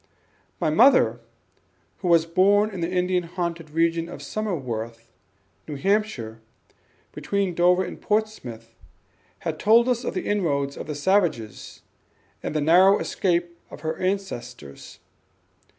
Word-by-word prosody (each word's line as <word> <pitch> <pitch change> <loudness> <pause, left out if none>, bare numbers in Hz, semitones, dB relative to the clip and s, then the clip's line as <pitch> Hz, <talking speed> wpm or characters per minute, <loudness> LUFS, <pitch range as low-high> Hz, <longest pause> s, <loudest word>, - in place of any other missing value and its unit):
My 155 - +1
mother, 245 - +5 0.8
who 185 - -4
was 170 -2 +4
born 200 +5 +3
in 190 -3 -6
the 165 - -1
Indian 180 0 +1
haunted 170 -2 -5
region 165 +1 0
of - - -9
Somersworth, 115 - -4 0.6
New 150 - -5
Hampshire, 140 - -1 0.7
between 200 -2 -2
Dover 180 +2 +3
and - - -8
Portsmouth, 130 - -3 0.9
told 230 +3 +5
us 250 -1 0
of - - -4
the 185 - -3
inroads 140 -9 0
of - - -8
the 150 - -4
savages, 145 - -1 0.6
and - - -5
the 155 - +1
narrow 185 +6 +6
escape 175 -2 -1
of - - -11
her 160 0 -2
ancestors. 125 - -5
175 Hz, 125 wpm, -24 LUFS, 145-195 Hz, 0.9 s, narrow